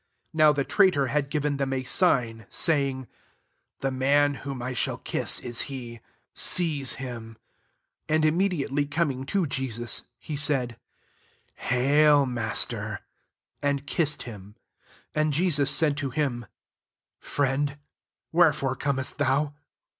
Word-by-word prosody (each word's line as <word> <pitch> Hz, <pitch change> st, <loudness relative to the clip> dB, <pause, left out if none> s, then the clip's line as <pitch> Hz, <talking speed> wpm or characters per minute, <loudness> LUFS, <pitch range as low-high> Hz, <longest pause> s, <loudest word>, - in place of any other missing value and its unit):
48 -, -, -12 dB
Now 155 Hz, -1 st, +7 dB
the 145 Hz, -2 st, 0 dB
traitor 180 Hz, -6 st, +3 dB
had 145 Hz, -2 st, 0 dB
giren 150 Hz, -1 st, -1 dB
them 135 Hz, -1 st, -1 dB
a 130 Hz, -1 st, -1 dB
sign, 125 Hz, -, +1 dB
saying, 135 Hz, -5 st, 0 dB, 0.4 s
<' -, -, -45 dB
The 135 Hz, -, 0 dB
man 140 Hz, +2 st, +2 dB
whom 135 Hz, -2 st, -5 dB
I 125 Hz, +1 st, -4 dB
shall 125 Hz, -, -1 dB
kiss, -, -, -1 dB
is 120 Hz, -1 st, -2 dB
he; 120 Hz, -4 st, -7 dB, 0.3 s
seize 155 Hz, -7 st, +3 dB
him«" 115 Hz, -4 st, -7 dB, 0.7 s
49 155 Hz, -, +1 dB
And 155 Hz, 0 st, +2 dB
im 155 Hz, +2 st, +2 dB
mediately 145 Hz, -7 st, 0 dB
coming 140 Hz, -3 st, -1 dB
to 195 Hz, +1 st, +1 dB
Jesus» 130 Hz, -4 st, -3 dB, 0.2 s
he 150 Hz, -, -6 dB
said, 135 Hz, -5 st, -1 dB, 0.4 s
" -, -, -37 dB, 0.2 s
Hail 145 Hz, +3 st, +4 dB
Master;" 115 Hz, -3 st, -2 dB, 0.6 s
and 140 Hz, -1 st, -1 dB
kiss 150 Hz, 0 st, +1 dB
ed -, -, -4 dB
him. 105 Hz, -3 st, -10 dB, 0.6 s
50 -, -, -2 dB
And 155 Hz, -1 st, +1 dB
Jesus 145 Hz, -3 st, +3 dB
said 150 Hz, -1 st, +3 dB
to 145 Hz, -3 st, -2 dB
him) 120 Hz, -5 st, -2 dB, 0.7 s
"Friend, 140 Hz, +1 st, -1 dB, 0.5 s
wherefore 150 Hz, -6 st, +3 dB
comest 135 Hz, -1 st, -2 dB
thou 145 Hz, +1 st, +1 dB
140 Hz, 140 wpm, -26 LUFS, 125-150 Hz, 0.7 s, Now